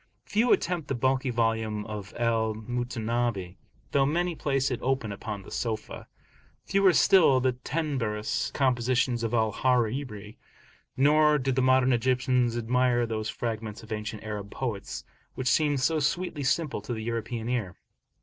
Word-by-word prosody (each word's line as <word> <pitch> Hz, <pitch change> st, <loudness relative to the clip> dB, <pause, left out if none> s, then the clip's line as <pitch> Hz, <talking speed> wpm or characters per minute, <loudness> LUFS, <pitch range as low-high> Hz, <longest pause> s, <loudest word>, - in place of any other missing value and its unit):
Few 225 Hz, +4 st, +2 dB
attempt 175 Hz, -3 st, +1 dB
the 135 Hz, -, -1 dB
bulky 130 Hz, +2 st, +1 dB
volume 110 Hz, -3 st, 0 dB
of 105 Hz, -2 st, -7 dB
Al 115 Hz, -2 st, +1 dB
Mutanabbi 115 Hz, -4 st, -2 dB, 0.3 s
though 140 Hz, -, +3 dB
many 175 Hz, +4 st, 0 dB
place 135 Hz, -3 st, 0 dB
it 125 Hz, -, -2 dB
open 130 Hz, -5 st, -1 dB
upon 100 Hz, 0 st, -6 dB
the -, -, -13 dB
sofa, 110 Hz, -2 st, -4 dB, 0.6 s
fewer 195 Hz, -1 st, +4 dB
still 165 Hz, -7 st, +5 dB
the 130 Hz, 0 st, +2 dB
tenebrous 125 Hz, -6 st, -2 dB
compositions 125 Hz, -2 st, +1 dB
of 115 Hz, +1 st, -1 dB
Al 110 Hz, -1 st, +2 dB
Hariri; 115 Hz, -3 st, -1 dB, 0.6 s
nor 150 Hz, +2 st, +5 dB
do 135 Hz, -1 st, -1 dB
the 130 Hz, 0 st, +1 dB
modern 130 Hz, 0 st, +4 dB
Egyptians 125 Hz, 0 st, +1 dB
admire 120 Hz, +1 st, +2 dB
those 110 Hz, -1 st, -3 dB
fragments 110 Hz, -2 st, -4 dB
of 110 Hz, -, -13 dB
ancient 105 Hz, 0 st, -4 dB
Arab 105 Hz, -2 st, -5 dB
poets, 110 Hz, -6 st, -4 dB, 0.3 s
which 130 Hz, -, -3 dB
seem 145 Hz, +1 st, +3 dB
so 155 Hz, +5 st, +1 dB
sweetly 155 Hz, +1 st, -1 dB
simple 140 Hz, -2 st, 0 dB
to 115 Hz, +4 st, -5 dB
the 110 Hz, -, -5 dB
European 115 Hz, 0 st, -3 dB
ear. 115 Hz, -8 st, -2 dB
120 Hz, 150 wpm, -27 LUFS, 110-135 Hz, 0.6 s, still